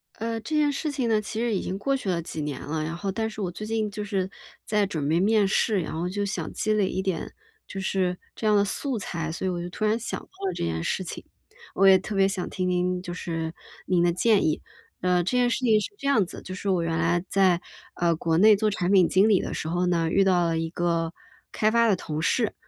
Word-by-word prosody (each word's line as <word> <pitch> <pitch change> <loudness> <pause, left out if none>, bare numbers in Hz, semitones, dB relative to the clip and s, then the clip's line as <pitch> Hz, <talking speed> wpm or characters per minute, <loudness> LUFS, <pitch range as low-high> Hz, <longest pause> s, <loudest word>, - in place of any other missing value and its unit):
呃， 225 +1 -3
这 310 - -3
件 295 -1 +3
事 300 +2 -2
情 270 -4 -1
呢， 220 -2 +2
其 215 +1 -5
实 235 -1 0
已 - - -1
经 190 - -3
过 275 +7 0
去 260 -7 -3
了 170 -2 0
几 160 -1 -6
年 145 -3 -4
了。 155 +1 -3
然 165 +2 -4
后 195 +3 -3
但 220 +3 -2
是 215 -1 -7
我 185 - -1
最 200 +4 -7
近 220 -1 -1
就 210 +1 -5
是 195 -3 -2 0.4
在 210 -1 +2
准 155 -8 -3
备 160 +3 +2
面 210 +1 +3
试， 210 +1 +2
然 - - -5
后 170 +3 -2
就 205 +2 -2
想 200 - -3
积 215 - 0
累 210 -3 +2
一 190 - -2
点 190 -3 -3 0.3
就 195 - -6
是 185 -1 0 0.2
这 220 - -5
样 210 - +4
的 200 0 +4
素 260 +5 -2
材， 165 -6 -4
所 170 - -4
以 - - +1
我 175 -1 -2
就 175 - -5
突 215 +4 -3
然 215 +1 +2
想 230 - -4
到 - - -15 0.2
了 - - -1
这 - - -4
件 80 0 -2
事 185 - -1
情， - - -7 0.5
我 195 - +3
也 190 -1 +8
特 200 +3 -5
别 195 0 +4
想 190 -2 -3
听 185 -1 -2
听 180 0 0
就 175 -1 -6
是 165 -2 -4 0.3
您 175 -2 +2
的 175 - +3
建 210 +4 +3
议。 155 - 0 0.4
呃， 180 -1 +2
这 220 +8 0
件 245 -1 +3
事 240 - 0
情 225 -4 +4
是 210 - -3
这 275 - -4
样 220 -8 +4
子， - - -9
就 185 - -7
是 185 +2 -6
我 185 -3 +2
原 165 0 -1
来 170 +1 +1
在， 185 -3 +3 0.3
呃， 170 -1 +1
国 165 0 +1
内 210 +3 +7
做 215 +1 +2
产 185 -2 -1
品 185 -4 +6
经 195 +4 +4
理 200 -4 +5
的 - - -4
时 160 - -3
候 175 +2 0
呢， 170 -2 +1
遇 195 +1 +4
到 180 -2 +3
了 165 -1 0
一 165 0 -2
个 170 -1 -1 0.4
开 215 0 +2
发 235 0 +4
的 205 - +4
同 155 -3 -4
事。 220 +6 +1
190 Hz, 285 characters per minute, -26 LUFS, 175-215 Hz, 0.5 s, 也